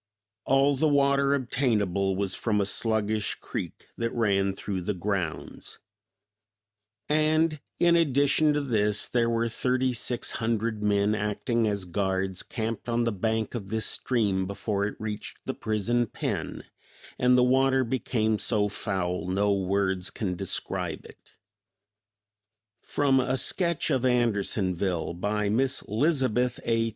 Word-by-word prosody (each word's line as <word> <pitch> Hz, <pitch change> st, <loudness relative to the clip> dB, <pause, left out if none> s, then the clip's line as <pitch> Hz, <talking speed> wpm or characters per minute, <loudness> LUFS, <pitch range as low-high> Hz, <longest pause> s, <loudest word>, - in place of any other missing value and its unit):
All 135 Hz, +1 st, +3 dB
the 155 Hz, +4 st, +2 dB
water 140 Hz, -1 st, +3 dB
obtainable 105 Hz, -8 st, 0 dB
was 95 Hz, -1 st, -1 dB
from 105 Hz, 0 st, 0 dB
a 100 Hz, -, +2 dB
sluggish 110 Hz, 0 st, 0 dB
creek -, -, -6 dB
that 115 Hz, 0 st, -1 dB
ran 100 Hz, -4 st, +1 dB
through 95 Hz, -1 st, -4 dB
the 100 Hz, +3 st, -2 dB
grounds; 95 Hz, -3 st, -4 dB, 1.3 s
and, 155 Hz, +1 st, +2 dB, 0.2 s
in 170 Hz, 0 st, +5 dB
addition 145 Hz, -1 st, +3 dB
to 145 Hz, -, 0 dB
this, 105 Hz, -6 st, +1 dB
there 120 Hz, -1 st, +1 dB
were 115 Hz, 0 st, +1 dB
thirty 125 Hz, +2 st, 0 dB
six 120 Hz, 0 st, -2 dB
hundred 110 Hz, -1 st, -1 dB
men 105 Hz, 0 st, +2 dB
acting 110 Hz, +2 st, 0 dB
as 100 Hz, -3 st, -1 dB
guards 95 Hz, +1 st, -1 dB
camped 115 Hz, -1 st, -4 dB
on 120 Hz, 0 st, +1 dB
the 115 Hz, -, +1 dB
bank 110 Hz, +2 st, -1 dB
of 105 Hz, -5 st, -5 dB
this 110 Hz, 0 st, -1 dB
stream 100 Hz, -7 st, 0 dB
before 100 Hz, 0 st, -2 dB
it 105 Hz, -, -6 dB
reached 105 Hz, -1 st, -5 dB
the -, -, -2 dB
prison 110 Hz, +3 st, 0 dB
pen, -, -, -4 dB, 0.6 s
and 125 Hz, 0 st, +4 dB
the 125 Hz, -, +5 dB
water 130 Hz, +1 st, +3 dB
became 115 Hz, -3 st, 0 dB
so 105 Hz, -1 st, 0 dB
foul 95 Hz, -3 st, -2 dB
no 100 Hz, +2 st, +2 dB
words 95 Hz, -1 st, 0 dB
can 95 Hz, -5 st, -3 dB
describe 95 Hz, +1 st, -3 dB
it." -, -, -17 dB, 1.5 s
From 140 Hz, -2 st, +2 dB
"A 130 Hz, +1 st, 0 dB
Sketch 170 Hz, +4 st, 0 dB
of 130 Hz, -3 st, +1 dB
Andersonville," 100 Hz, -8 st, 0 dB
by 105 Hz, +4 st, -1 dB
Mrs. 130 Hz, +6 st, 0 dB
Lizabeth 125 Hz, -1 st, +1 dB
A. 115 Hz, 0 st, +1 dB
110 Hz, 135 wpm, -27 LUFS, 100-130 Hz, 1.5 s, in